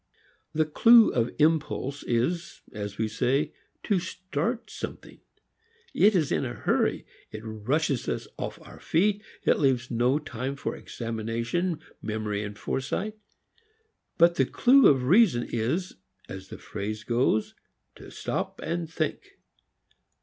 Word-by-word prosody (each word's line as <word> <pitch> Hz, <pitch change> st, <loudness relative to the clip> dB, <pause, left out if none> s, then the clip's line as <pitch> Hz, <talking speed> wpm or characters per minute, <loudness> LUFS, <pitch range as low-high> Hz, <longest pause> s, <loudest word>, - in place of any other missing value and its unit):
The 155 Hz, 0 st, +2 dB
clew 230 Hz, +9 st, +6 dB
of 120 Hz, -1 st, +1 dB
impulse 150 Hz, -3 st, +1 dB
is, 145 Hz, +9 st, -1 dB
as 105 Hz, -1 st, -6 dB
we 110 Hz, -, 0 dB
say, 135 Hz, +8 st, 0 dB, 0.3 s
to 200 Hz, -4 st, +2 dB
start 185 Hz, -, -3 dB
something. -, -, -8 dB, 0.7 s
It 210 Hz, +1 st, +5 dB
is 155 Hz, -6 st, +1 dB
in -, -, +1 dB
a 120 Hz, -2 st, -4 dB
hurry. -, -, 0 dB, 0.2 s
It 110 Hz, 0 st, -8 dB
rushes 125 Hz, +6 st, -1 dB
us -, -, -3 dB
off -, -, -5 dB
our -, -, -13 dB
feet. 205 Hz, +5 st, +1 dB, 0.2 s
It -, -, +3 dB
leaves 130 Hz, -3 st, +1 dB
no 120 Hz, +4 st, +2 dB
time 135 Hz, -2 st, -4 dB
for 140 Hz, -, -4 dB
examination, 115 Hz, +9 st, -3 dB, 0.2 s
memory 105 Hz, -1 st, -2 dB
and 105 Hz, -1 st, -7 dB
foresight. 190 Hz, -, -3 dB, 1.0 s
But 170 Hz, 0 st, +5 dB
the 135 Hz, -, +4 dB
clew 265 Hz, +2 st, +6 dB
of 130 Hz, -3 st, +4 dB
reason 170 Hz, -, +4 dB
is, 130 Hz, +12 st, -2 dB, 0.3 s
as 95 Hz, 0 st, -8 dB
the -, -, -9 dB
phrase 105 Hz, +1 st, -5 dB
also -, -, -31 dB
goes, 115 Hz, -2 st, +1 dB, 0.4 s
to -, -, -12 dB
stop -, -, -4 dB
and 170 Hz, 0 st, -2 dB
think. 385 Hz, -, -4 dB
140 Hz, 135 wpm, -27 LUFS, 115-170 Hz, 1.0 s, clew